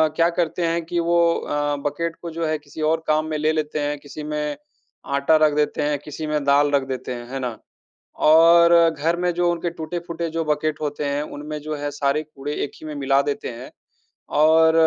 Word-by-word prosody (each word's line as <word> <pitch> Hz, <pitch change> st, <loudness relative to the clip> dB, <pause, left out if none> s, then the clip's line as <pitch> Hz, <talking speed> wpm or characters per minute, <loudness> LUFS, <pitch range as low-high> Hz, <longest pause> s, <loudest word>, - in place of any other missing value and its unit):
क्या 165 Hz, +1 st, +3 dB
करते 170 Hz, 0 st, 0 dB
हैं 165 Hz, 0 st, 0 dB
कि 170 Hz, +1 st, -2 dB
वो 170 Hz, +1 st, +2 dB, 0.2 s
अ, 145 Hz, 0 st, -1 dB
बकेट 165 Hz, +3 st, -4 dB
को 170 Hz, -, -5 dB
जो 165 Hz, +1 st, -3 dB
है, 155 Hz, 0 st, 0 dB
किसी 150 Hz, +1 st, -10 dB
और 160 Hz, 0 st, -1 dB
काम 155 Hz, 0 st, +2 dB
में 155 Hz, -, -1 dB
ले 155 Hz, +1 st, +2 dB
लेते 155 Hz, -1 st, -2 dB
हैं, 145 Hz, 0 st, -1 dB
किसी 150 Hz, +1 st, -9 dB
में 150 Hz, 0 st, -3 dB, 0.6 s
आटा 140 Hz, +3 st, +3 dB
रख 150 Hz, -, +2 dB
देते 150 Hz, 0 st, 0 dB
हैं, 145 Hz, 0 st, 0 dB
किसी 155 Hz, +1 st, -6 dB
में 150 Hz, -1 st, -1 dB
दाल 145 Hz, +1 st, +3 dB
रख 140 Hz, -1 st, +2 dB
देते 130 Hz, -1 st, -4 dB
हैं। 120 Hz, -1 st, -8 dB
है 135 Hz, -, -3 dB
ना? 125 Hz, -3 st, -4 dB, 0.7 s
और 170 Hz, +2 st, +7 dB, 0.2 s
घर 160 Hz, +2 st, -1 dB
में 180 Hz, 0 st, +1 dB
जो 175 Hz, 0 st, +2 dB
उनके 170 Hz, 0 st, -2 dB
टूटे-फूटे 170 Hz, +1 st, -5 dB
जो 165 Hz, 0 st, 0 dB
बकेट 150 Hz, 0 st, -1 dB
होते 145 Hz, 0 st, -3 dB
हैं, 145 Hz, +1 st, -1 dB
उनमें 150 Hz, 0 st, -6 dB
जो 155 Hz, 0 st, -4 dB
है, 145 Hz, 0 st, -3 dB
सारे 145 Hz, +1 st, 0 dB
कूड़े 145 Hz, -1 st, -7 dB
एक -, -, -6 dB
ही 155 Hz, -, -9 dB
में 150 Hz, -, -5 dB
मिला 135 Hz, 0 st, +2 dB
देते 145 Hz, 0 st, -3 dB
हैं 120 Hz, +2 st, -9 dB, 0.7 s
और 160 Hz, +1 st, +6 dB
150 Hz, 215 wpm, -22 LUFS, 145-165 Hz, 0.7 s, और